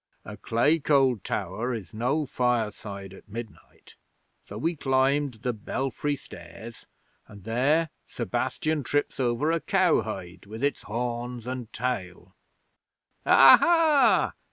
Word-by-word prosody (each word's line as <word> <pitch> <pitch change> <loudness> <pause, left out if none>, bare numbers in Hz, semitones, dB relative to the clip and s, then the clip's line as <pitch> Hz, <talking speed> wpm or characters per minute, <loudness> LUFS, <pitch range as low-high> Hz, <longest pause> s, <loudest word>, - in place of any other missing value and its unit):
'A - - -8
clay 145 +8 +2
cold 135 - +2
tower 115 +8 -3
is 100 -7 -9
no 125 +8 0
fireside 110 -6 -2
at 95 - -16
midnight, 115 0 -10 0.5
so 100 - -8
we 165 +9 -1
climbed 135 -1 +1
the 125 - 0
belfry 135 +6 -3
stairs, 110 0 -12 0.4
and 100 -2 -14
there 140 - +1 0.2
Sebastian 155 -1 -2
trips 145 +3 -2
over 130 +5 +1
a 165 - +1
cow 185 -1 +2
hide 95 -3 -8
with 110 +5 -8
its 145 -2 0
horns 120 +1 -4
and 125 -2 -6
tail. 115 -9 -4 0.9
'"Aha! 275 - +6
125 Hz, 120 wpm, -26 LUFS, 110-145 Hz, 0.9 s, Aha